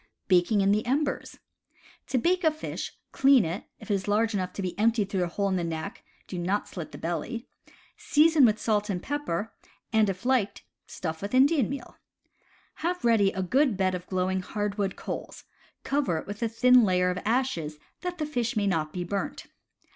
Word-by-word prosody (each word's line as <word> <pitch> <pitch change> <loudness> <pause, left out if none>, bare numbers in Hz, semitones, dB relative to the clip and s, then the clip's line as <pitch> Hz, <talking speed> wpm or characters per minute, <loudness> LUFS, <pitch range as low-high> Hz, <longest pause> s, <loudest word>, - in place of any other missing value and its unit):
Baking 190 +3 +4
in 195 0 +3
the 210 +1 +2
Embers. 280 +3 -1 0.4
— - - -28
To 260 - 0
bake 360 +8 +2
a 320 - +6
fish, 310 0 -5 0.2
clean 270 -5 +5
it 170 +5 -4
— - - -50
if - - -6
it - - +4
is 195 0 -1
large 215 +2 +2
enough 185 -2 -1
to 200 - -4
be 180 -2 -2
emptied 220 -2 +2
through 190 -2 +1
a - - 0
hole 200 +4 -1
in 190 -1 +1
the 175 - -1
neck, 165 +6 -5 0.2
do 180 - -5
not 190 +4 -1
slit 170 -4 -7
the - - -9
belly 175 +9 -4 0.3
— - - -29
season 310 0 +5
with 215 -3 +4
salt 210 -1 0
and 180 -3 -2
pepper, 225 -8 -3 0.4
and, 220 -2 +4
if 190 +4 -5
liked, 250 -6 +1 0.2
stuff 160 -3 -5
with 200 +5 -3
Indian 275 -2 +4
meal. 275 -3 -7 0.8
Have 355 -3 -1
ready 215 -4 +4
a 190 - -2
good 255 +3 +2
bed 190 -1 +1
of 180 0 -5
glowing 185 0 0
hardwood 205 0 -2
coals; - - -6 0.4
cover 275 - 0
it - - -5
with 205 +2 -7
a 230 - +1
thin 250 +2 +5
layer 180 -2 +2
of 180 - -3
ashes, 215 - 0 0.2
that 360 -1 -4
the 305 - -1
fish 240 -6 -2
may 205 - +2
not 160 -5 0
be 180 +1 -3
burnt. 195 +3 -3
205 Hz, 205 wpm, -27 LUFS, 185-255 Hz, 0.8 s, a